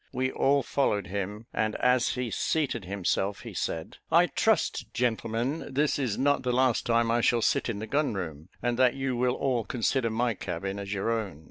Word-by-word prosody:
We 130 0 -1
all 140 0 +2
followed 105 -8 0
him; 100 +4 -4
and 110 0 0
as 125 -1 +2
he 125 -2 -3
seated 125 -2 -1
himself, 100 +1 -1
he - - -8
said 80 -1 -3
"I - - +6
trust, - - 0
gentlemen, 120 +4 -1
this 145 +2 +1
is 125 -7 -1
not 145 +2 +2
the 125 - -1
last 125 -1 +2
time 115 -1 +3
I 120 +1 +2
shall 115 0 +3
sit - - +1
in 115 - -2
the 110 - -4
gun 140 0 0
room, 80 -3 -6
and 120 0 0
that 130 -1 +4
you 135 -2 -1
will 125 +1 +1
all 125 -4 0
consider 120 +1 0
my 115 +1 0
cabin 95 +1 -4
as 100 0 -6
your 100 +3 -1
own. 105 -9 -3
115 Hz, 200 wpm, -28 LUFS, 100-130 Hz, -, I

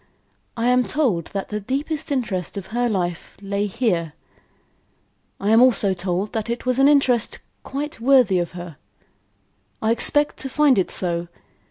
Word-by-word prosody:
I 235 +2 +1
am 250 0 +4
told 210 - 0
that 195 -1 -5
the 210 - -3
deepest 280 +8 -3
interest 210 -9 -2
of 195 - -6
her 240 0 +1
life 175 -4 -3
lay 200 +1 -2
here. 190 - -1 1.3
I 205 +2 0
am 225 +2 +6
also 225 -6 +4
told 185 +2 -3
that 220 0 -3
it 235 +1 -3
was 255 +1 0
an 270 - +6
interest 265 -5 +2 0.2
quite 285 -1 -5
worthy 245 -7 +4
of 175 -1 -3
her. 175 -4 -9 1.0
I 220 - +1
expect 290 +5 +3
to 270 - -3
find 290 -5 +3
it 185 - 0
so. 170 -1 -2
220 Hz, 160 wpm, -22 LUFS, 185-255 Hz, 1.3 s, am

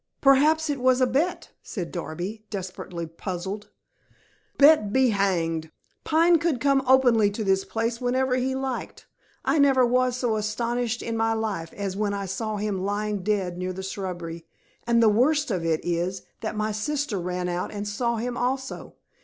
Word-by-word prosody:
"Perhaps 300 +4 +4
it 280 - -3
was 255 0 +3
a 255 - +5
bet," 335 +7 -1
said 180 -5 -5
Darby, 180 +5 -5
desperately 185 -3 -5
puzzled. 190 +5 -6 0.9
"Bet, 285 -8 +6
be 260 +2 +4
hanged! 165 -5 0 0.3
Pine 330 +2 +4
could 325 -6 0
come 275 +1 +3
openly 245 -5 +5
to 210 +2 -4
this 195 -1 +2
place 230 +3 -2
whenever 255 +1 +1
he 260 +1 0
liked. 265 -1 -4 0.4
I 315 - +2
never 270 -3 +5
was 250 +1 +2
so 240 -4 0
astonished 235 +2 -2
in 230 - -3
my 225 0 +1
life 210 -7 -3
as 195 -2 -4
when 205 0 -1
I 200 0 -3
saw 210 +3 -3
him 200 -2 -2
lying 205 0 -1
dead 185 -3 -1
near 185 0 -2
the 190 +1 -6
shrubbery. 175 -4 -5 0.4
And 235 -1 +4
the - - +6
worst 270 +6 +3
of 180 -4 -1
it 160 -1 +1
is, 175 +2 -1 0.2
that 220 - -4
my 215 0 0
sister 265 0 -2
ran 180 0 -3
out 175 0 -2
and 205 0 -5
saw 235 +3 -1
him 240 +2 -3
also. 260 +2 -3
215 Hz, 170 wpm, -25 LUFS, 190-255 Hz, 0.9 s, Bet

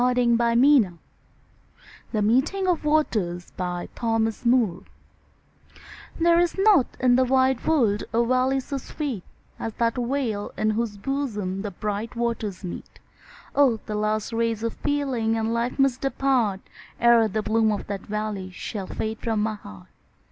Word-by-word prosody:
SHAKESPEARE 240 -2 +4 1.2
THE 215 -3 0
MEETING 270 - +2
OF 355 -3 +1
THE 300 - -1
WATERS 200 - 0
There 180 -1 -3 2.5
is 350 +1 +1
not 390 - +5
in 250 -1 +4
the 260 - +4
wide 260 0 +2
world 230 -10 +2
a 235 +1 +2
valley 255 +2 +2
so 275 +1 -4
sweet 260 - -5 0.4
As 225 - -4
that 230 +1 0
vale 240 -4 -2
in 215 - +1
whose 215 -1 -2
bosom 210 -6 -3
the 205 - -3
bright 210 +4 -4
waters 230 -5 -2
meet; 180 - -8 0.6
Oh! 265 -6 +3
the 215 - -5
last 215 +1 -1
rays 230 -1 0
of 230 - -1
feeling 265 -6 -1
and 225 +1 -1
life 235 +1 -1
must 270 -2 +2
depart, 260 -7 +1 0.4
Ere 235 -1 +5
the 215 +1 -2
bloom 220 +1 +2
of 205 - -3
that 200 -1 -4
valley 210 -3 -4
shall 190 +1 -6
fade 220 0 -4
from 220 -3 -1
my 220 0 0
heart. 95 - -12
230 Hz, 140 wpm, -24 LUFS, 210-260 Hz, 2.5 s, not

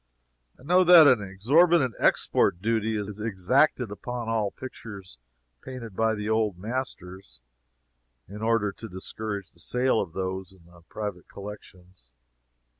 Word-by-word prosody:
I - - -17
know 180 +5 +4
that 175 -3 +9
an 125 -6 +5
exorbitant 130 - +3
export 85 - +2
duty 110 +1 0
is 105 0 -5
exacted 115 +4 +1
upon 120 +3 -5
all 110 -3 0
pictures 100 - -10 0.4
painted 125 -6 -9
by 110 +1 +1
the 105 0 -5
old 110 -4 0
masters, 100 - -6 0.9
in 105 +4 -9
order 110 -2 +1
to 115 +3 -10
discourage 100 +1 -6
the 85 - -21
sale 125 +4 +1
of 80 - -6
those 95 0 -4
in 90 -3 -22
the 85 0 -19
private 105 -4 -6
collections. 95 - -12
105 Hz, 135 wpm, -26 LUFS, 95-120 Hz, 0.9 s, that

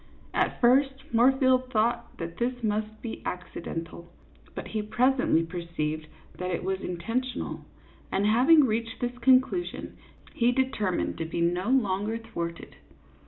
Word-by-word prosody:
At - - 0
first, 270 +2 +3
Moorfield 255 +1 +4
thought 235 +2 0
that 165 0 -6
this 245 0 -2
must 215 0 -2
be 230 - -5
accidental, 170 -1 -6 0.4
but - - -6
he 215 - -1
presently 230 -4 +2
perceived 165 -2 -4 0.3
that 180 0 -2
it 175 - -2
was 190 +1 -1
intentional; 230 +9 -3 0.5
and 200 - +1
having 265 +8 +6
reached 230 0 -2
this 245 0 -2
conclusion, 260 +8 +2 0.4
he 240 +1 +3
determined 240 -10 -1
to 165 - -1
be 165 - -4
no 175 +5 +1
longer 215 -3 +1
thwarted. 170 -7 -6
225 Hz, 130 wpm, -27 LUFS, 180-255 Hz, 0.5 s, having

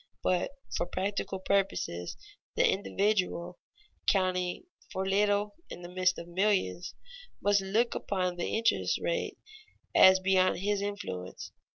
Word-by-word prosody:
But 180 -1 +1 0.3
for 175 - -1
practical 195 +1 -2
purposes 190 - -1 0.4
the - - +4
individual, 190 -3 0 0.5
counting 185 - +1 0.3
for 190 - -2
little 205 +1 +2 0.2
in 175 - -8
the 175 - -7
midst 185 0 +1
of 170 - -7
millions, 175 - 0 0.4
must 205 -1 +3
look 215 +5 +1
upon 185 -3 -1
the 175 - -2
interest 230 +1 +1
rate - - -2 0.6
as 190 0 +8
beyond 185 0 +3
his 205 0 0
influence. 200 - -5
190 Hz, 120 wpm, -30 LUFS, 180-205 Hz, 0.6 s, as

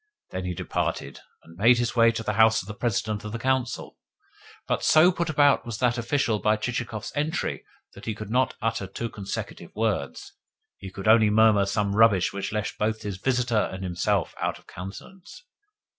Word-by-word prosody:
Then 95 0 -4
he 90 -1 -3
departed, - - -3 0.2
and 80 - -16
made 120 +5 +5
his 120 -2 -1
way 115 -1 +5
to 115 - -4
the 105 - -1
house 110 +1 +4
of - - -15
the 105 - -6
President 110 -1 -2
of 105 0 -6
the - - -2
Council. 130 0 -2 0.7
But - - -1
so 160 +4 +6
put 170 -1 -2
about 145 -2 +4
was 115 -3 -5
that 125 -1 +1
official 120 -3 0
by 110 +1 +2
Chichikov's 115 -1 -4
entry 150 +2 -2 0.3
that - - -12
he 110 - -3
could 110 0 -8
not 130 +1 +1
utter 115 -3 -1
two 115 +5 -5
consecutive 100 -3 -6
words 105 -10 -2 0.5
he 95 - -8
could 95 +2 -7
only 110 -1 +6
murmur 105 -2 +4
some 100 0 0
rubbish 105 -5 +4
which 100 0 -4
left 105 0 -3
both 110 +1 -1
his 100 -2 -4
visitor 120 -1 0
and 95 0 -6
himself 95 0 -1
out - - -1
of - - -21
countenance. 180 - -10
110 Hz, 190 wpm, -25 LUFS, 100-120 Hz, 0.7 s, so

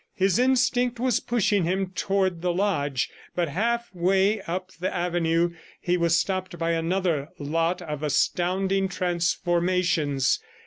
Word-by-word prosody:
His 190 +2 +2
instinct 250 -1 +2
was 255 0 +2
pushing 210 -4 +1
him 185 +2 -1
toward 190 -3 0
the 180 0 +1
lodge, 145 - 0 0.2
but 175 -3 0
half 235 +8 -1
way 190 +4 +2
up 185 +2 -4
the 180 +1 -3
avenue, 175 -1 0 0.3
he 175 -1 0
was 170 -1 +2
stopped 185 -2 -2
by 165 0 0
another 165 -3 0
lot 165 +5 -1
of 150 -3 -5
astounding 190 +5 +1
transformations. 170 -4 +1
180 Hz, 130 wpm, -25 LUFS, 165-195 Hz, 0.3 s, His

